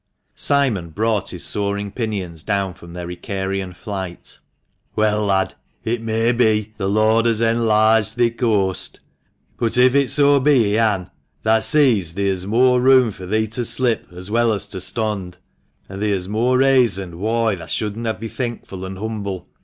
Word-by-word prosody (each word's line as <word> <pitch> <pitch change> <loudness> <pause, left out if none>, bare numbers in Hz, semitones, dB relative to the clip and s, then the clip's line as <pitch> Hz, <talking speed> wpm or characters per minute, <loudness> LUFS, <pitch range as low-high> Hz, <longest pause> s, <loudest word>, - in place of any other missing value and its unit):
Simon 125 -12 +1
brought 105 +2 -1
his 90 - -4
soaring 100 0 0
pinions 95 -9 -4
down 100 -1 -1
from 85 0 -14
their 90 -1 -6
Icarian 95 0 -4
flight. 95 -3 -7 0.6
"Well, 105 0 +1
lad, 95 -1 +1 0.3
it 115 +1 -2
may 115 +1 +1
be 110 -3 +1
'the 95 -2 -2
Lord 110 +2 +3
has 115 -2 +1
enlarged 110 -2 +3
thi 120 -1 +2
coast,' 105 -6 -1 0.6
but 115 0 0
if 130 +2 +4
so 145 -1 +4
be 135 -3 +4
He 100 -1 0
han, 105 -5 +1 0.3
thah 110 0 +3
sees 110 - +2
theer's 95 -1 -2
moore 125 +3 +3
room 130 -3 +5
fur 95 -2 -10
thee 110 +3 0
to 120 +3 -2
slip 120 0 +1
as 90 +3 -8
well 115 0 +2
as 100 - -2
to 95 - -5
stond, 95 -1 -2 0.5
and 95 +1 -8
theer's 100 -4 0
moore 120 +5 +1
rayson 115 -10 +2
whoi 110 +1 0
thah 85 - -10
shouldn 105 +1 -3 0.2
be 115 - -5
thenkful 115 -4 -6
and 95 0 -6
humble 100 -3 -5
110 Hz, 160 wpm, -20 LUFS, 95-115 Hz, 0.6 s, room